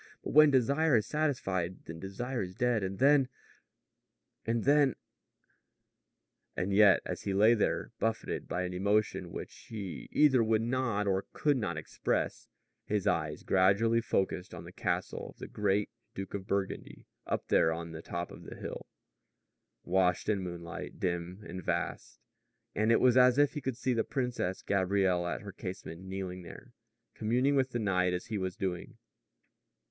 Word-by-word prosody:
But - - -4
when 155 +1 +8
desire 140 +3 +3
is 110 - 0
satisfied, 95 - -1
then 80 0 -8
desire 120 +7 -4
is 90 -1 -5
dead, 120 -1 +1
and 95 0 -3
then 135 -1 +5 1.2
and 115 -1 +1
then 145 -1 +4 0.8
" - - -42
And 95 +2 -1
yet, 100 -1 +6
as - - -4
he 100 -1 -2
lay 110 +4 +6
there, 110 - 0
buffeted 115 0 -2
by 90 - -2
an 90 0 -3
emotion 100 +3 0
which - - -7
he 100 - -6
either 135 -6 +5
would 110 0 +2
not 120 -4 0
or 95 -1 0
could 145 -1 +2
not 100 -10 -2
express, 80 - -2 0.4
his 105 -2 0
eyes 75 -6 0
gradually 100 +5 +3
focused 95 -4 -1
on 80 - -8
the 85 - -10
castle - - -2
of - - -15
the - - -7
great 105 0 0 0.2
Duke 95 0 -6
of 100 -1 -5
Burgundy 100 -1 -3 0.2
up - - -2
there 80 - +4
on 85 0 -5
top 85 +1 -5
of - - -11
the - - -9
hill - - -7 1.0
washed 90 0 +1
in 100 -2 +1
moonlight, 85 -2 -7
dim 90 +2 -3
and 90 +1 -7
vast; - - -3 0.6
and 110 +2 +2
it 115 - +5
was 125 -1 +5
as 125 0 +6
if 145 -1 +4
he 150 - -4
could 130 -3 -3
see 130 0 0
the 115 - +1
Princess 125 -9 -2
Gabrielle 95 -2 +1
at - - -3
her 100 - -8
casement, 90 -3 -7
kneeling 95 -1 -5
there, 85 - -12 0.4
communing 125 +6 +1
with 130 -1 +2
the 120 - -3
night 90 -4 +1
as 90 - -3
he 110 -2 -3
was 95 -1 -3
doing. 90 -2 -4
100 Hz, 165 wpm, -31 LUFS, 90-120 Hz, 1.2 s, when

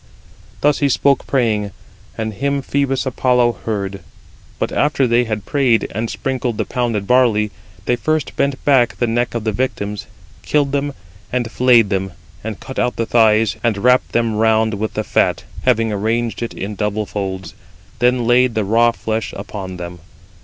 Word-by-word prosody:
Thus 150 -1 +3
he 145 - +2
spoke 140 +1 +2
praying, 110 -6 +1 0.5
and 110 -1 -3
him 140 +5 -1
Phœbus 135 -1 0
Apollo 125 -2 +2
heard. 100 -3 -3 0.6
But - - -2
after 145 -2 +2
they 120 0 +3
had 110 -3 -4
prayed, 130 -7 +2
and 110 +3 -2
sprinkled 130 -4 -2
the - - -1
pounded 115 -5 -1
barley, 110 -3 +3 0.3
they 125 - +2
first 155 +4 -1
bent 140 -1 -1
back 130 -5 +4
[the 120 - 0
neck 120 +1 -1
of 115 - -2
the 110 - 0
victims], 105 -3 -3 0.3
killed 145 -2 +1
them, 140 0 -1 0.4
and 120 -2 -1
flayed 120 -5 +4
them, 95 -1 -1 0.3
and 110 -2 -5
cut 130 - -6
out 125 - 0
the 115 - -1
thighs, 110 -2 +3
and 115 -4 +1
wrapped 125 +4 +3
them 115 -1 +1
round 110 0 +3
with 105 +1 -3
the 110 - -1
fat, - - +1 0.2
having 115 -3 +2
arranged 115 +3 -1
it 115 - -4
in 100 +2 -4
double 105 +1 -2
folds; 95 -1 -5 0.5
then 125 0 +2
laid 120 0 +3
the 110 -2 0
raw 115 +4 +4
flesh 110 -1 -3
upon 95 -3 -6
them. 90 0 -7
115 Hz, 170 wpm, -18 LUFS, 105-125 Hz, 0.6 s, back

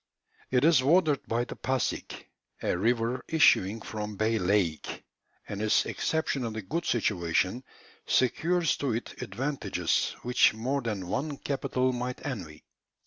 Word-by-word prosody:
It 125 0 +2
is 160 -5 +6
watered 150 0 +3
by 115 +1 0
the - - -7
Passig, 130 -1 -2 0.4
a - - +1
river 115 +5 0
issuing 115 -9 +4
from 105 -1 -5
Bay 110 +2 +1
Lake, 90 -4 0 0.4
and 105 0 -5
its 110 0 +3
exceptionally 125 -9 -2
good 165 - -3
situation 95 +1 0 0.4
secures 165 +7 +2
to 135 -5 -1
it 115 - -6
advantages 135 +8 -1
which 125 -2 +4
more 130 +5 -1
than 105 -6 -3
one 145 - -2
capital 130 -2 -1
might 125 +1 -4
envy. 90 - -6
120 Hz, 130 wpm, -28 LUFS, 105-135 Hz, 0.4 s, is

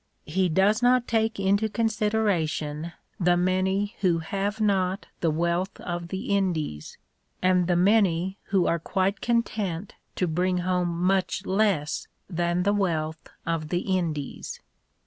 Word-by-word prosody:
He 180 +4 +1
does 195 +7 +3
not 245 0 +4
take 225 -1 +1
into 200 +3 +2
consideration 205 -9 0 0.3
the 175 -1 +3
many 190 +4 +1
who 180 -4 +3
have 200 +6 -2
not 195 -2 +1
the 165 - +1
wealth 170 +4 -1
of 175 -1 -4
the 190 +2 -2
Indies, 160 - -2 0.4
and 180 -1 +3
the 175 - +2
many 190 -1 +3
who 190 -3 +2
are 170 - +1
quite 190 +4 -1
content 210 -6 -1 0.2
to 185 - +1
bring 180 +2 0
home 180 -1 +1
much 185 +2 0
less 190 -7 +1 0.2
than 175 0 0
the 200 +2 +2
wealth 160 -6 -1 0.2
of 165 -2 -2
the 180 +3 0
Indies. 155 -6 -3
185 Hz, 135 wpm, -26 LUFS, 170-200 Hz, 0.4 s, not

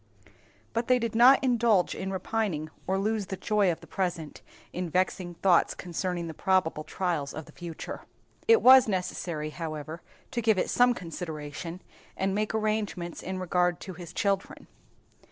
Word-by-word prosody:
But 230 +1 -1
they 255 - +5
did 230 -2 -2
not 250 +5 +7
indulge 235 -7 +3
in 190 - -4
repining 190 -5 -2 0.2
or 190 - +1
lose 210 0 -1
the 195 - -4
enjoyment 200 0 +2
of - - -11
the - - -12
present 175 -5 -3 0.3
in 180 -1 -3
vexing 180 0 -1
thoughts 175 0 +3
concerning 175 0 -3
the 165 - -6
probable 170 -3 +1
trials 165 -5 -2
of 155 0 -6
the - - -15
future. 170 -2 -7 0.4
It 455 0 +6
was 260 -1 +9
necessary, 175 -5 -3
however, 155 0 -6 0.3
to 240 - -1
give 220 -3 +3
it - - 0
some 245 0 +4
consideration, 165 0 -6 0.3
and 190 0 0
make 215 +2 -1
arrangements 215 -5 -2
in 190 0 -4
regard 180 -1 +1
to 190 - -7
his 175 -1 -9
children. 200 -1 -1
185 Hz, 160 wpm, -28 LUFS, 170-215 Hz, 0.4 s, was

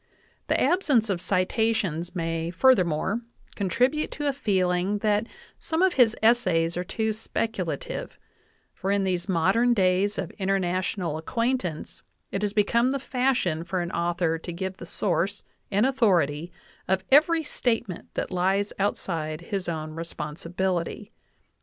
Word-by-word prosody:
The - - +2
absence 270 - +3
of 175 -3 -2
citations 185 -2 0
may, 165 -1 -2
furthermore, 185 - +3 0.3
contribute 250 - +1
to 295 - -4
a 280 - +2
feeling 190 -5 +1
that 210 +2 +2 0.3
some 320 +3 0
of 380 -2 +4
his 240 -4 +4
essays 185 -8 +3
are 180 - -1
too 220 +4 -1
speculative, 205 -7 -3 0.6
for 190 - -4
in 200 0 +2
these 185 0 -1
modern 195 +8 +3
days 190 +1 +2
of 190 -4 -3
international 185 -3 -1
acquaintance 230 -3 -2 0.3
it 195 - -2
has 205 -1 0
become 230 +4 +2
the 275 - 0
fashion 250 - 0
for 185 +2 -2
an 175 -1 -3
author 170 -1 0
to 175 - -6
give 190 +2 -4
the - - -9
source 190 +1 -1 0.3
and 205 +3 +2
authority 175 - +2 0.4
of 190 0 +1
every 315 +4 +5
state 240 -5 -1
ment 180 - -8
that - - -2
lies 190 +3 +1
outside 165 -6 -1
of - - -15
his 195 -4 -2
own 155 -2 -4
responsibility. 170 +5 -3
190 Hz, 140 wpm, -26 LUFS, 175-225 Hz, 0.6 s, every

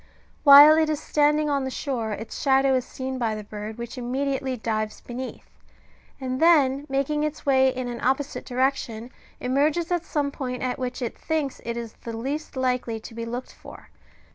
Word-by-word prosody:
While 290 +2 +10
it 315 -1 +2
is 305 -2 -1
standing 300 0 +2
on 280 -2 0
the 265 - -2
shore 250 -5 -3
its 215 +2 -6
shadow 270 -1 +4
is 255 -1 +1
seen 260 0 -5
by 225 -3 0
the 215 - -6
bird, 210 +1 -7
which 235 +2 -6
immediately 265 +1 -2
dives 215 -1 -2
beneath, 250 +1 -7 0.7
and 260 -1 -3
then 290 -4 +4
making 275 +2 0
its 305 0 -4
way 265 -1 +4
in 255 -1 -4
an 240 -1 -5
opposite 270 +2 -1
direction, 250 -2 -1 0.3
emerges 295 +7 +1
at 350 -2 +1
some 290 -4 -1
point 250 -3 -4
at 255 0 -2
which 250 0 -3
it 235 - -3
thinks 310 -4 -2
it 235 0 -4
is 230 -2 -6
the 230 -1 -5
least 280 +6 -4
likely 250 -3 -1
to 225 - -11
be 230 0 -5
looked 240 +2 -6
for. - - -13
260 Hz, 185 wpm, -25 LUFS, 240-285 Hz, 0.7 s, While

